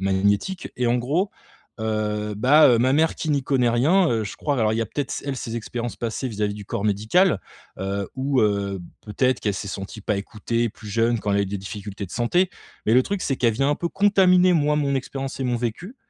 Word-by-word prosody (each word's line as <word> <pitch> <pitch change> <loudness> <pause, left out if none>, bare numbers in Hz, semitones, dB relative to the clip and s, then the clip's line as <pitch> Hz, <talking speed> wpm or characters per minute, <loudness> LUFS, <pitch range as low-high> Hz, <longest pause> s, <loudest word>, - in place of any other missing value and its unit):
magnétique 100 - 0
et 125 - 0
en 120 - +3
gros, 155 +11 0 0.5
heu, 105 -1 -2
bah, 145 +8 +6
heu, 120 - +5
ma 130 +3 +3
mère 160 +2 +3
qui 160 - -2
n'y 140 -2 +1
connaît 130 -3 +2
rien, 160 +10 +3
heu, 110 -2 0
je 100 - -6
crois 145 -3 -1
alors 110 -2 +2
il - - -1
y - - 0
a - - -4
peut-être 140 +2 -4
s - - -4
elle 140 -2 -2
ses 115 -2 -5
expériences 120 +1 -4
passées 115 +3 -3
vis-à-vis 105 -2 -2
du 105 -1 -8
corps 100 - -3
médical, 110 - +2 0.4
heu, 100 +1 -3
ou 135 0 +1
heu, 100 -2 0 0.2
peut-être 125 +4 0
qu'elle 105 -2 -1
s'est 100 +1 -5
sentie 95 +2 -6
pas 105 - 0
écoutée, 115 +3 -2
plus 110 0 -12
jeune 115 +2 +1
quand 105 - -2
elle 100 - +2
a - - +3
eu - - -2
des 100 +1 -4
difficultés 100 +1 -7
de - - -18
santé. 175 +10 +1 0.4
Mais 110 - +4
le 130 - +6
truc, 200 -1 -2
c'est 135 - -1
qu'elle 115 -4 +2
vient 135 +5 +1
un 145 - +1
peu 170 - -2
contaminer 185 -2 +4
moi 150 -3 +2
mon 140 -2 +1
expérience 135 +1 -5
et - - -1
mon 125 -1 0
vécu 125 - -4
120 Hz, 240 wpm, -23 LUFS, 105-140 Hz, 0.5 s, bah